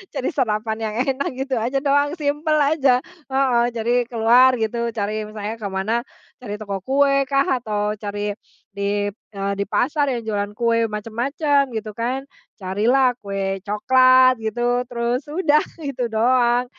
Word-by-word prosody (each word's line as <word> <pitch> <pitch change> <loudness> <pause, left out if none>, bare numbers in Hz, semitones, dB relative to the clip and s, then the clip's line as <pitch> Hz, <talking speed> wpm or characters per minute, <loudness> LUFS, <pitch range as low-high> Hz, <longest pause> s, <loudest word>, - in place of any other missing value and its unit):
cari 260 - -1
sarapan 220 -5 -1
yang 215 -1 -3 0.2
enak 270 +2 -3
gitu 265 -2 -2
aja 260 +5 -1
doang 285 +2 +2
simple 305 0 0
aja, 280 -4 +3 0.2
heeh, 265 -3 +2
jadi 235 +1 0
keluar 245 +2 +5
gitu 235 +1 -2
cari 215 0 -2
misalnya 215 +1 -6
ke 205 - -4
mana, 215 +6 -2 0.3
cari 210 -4 -6
toko 200 -2 -5
kue 275 0 +3
kah 275 -1 +1
atau 210 -2 -2
cari 205 0 -3 0.4
di, 205 0 -1
eee, 200 -1 -5
di 200 - 0
pasar 285 +5 +1
yang 240 -3 -2
jualan 205 -2 -2
kue 230 -1 +2
macam-macam 270 +7 0
gitu 215 0 -5
kan 250 +5 -3 0.3
carilah 225 +7 +2
kue 195 -2 -3
coklat 255 +5 +5
gitu 240 +3 0
terus 240 +1 -1
udah 305 -2 +3 0.2
gitu 270 -6 -3
doang 240 +2 +2
235 Hz, 145 wpm, -21 LUFS, 215-265 Hz, 0.4 s, keluar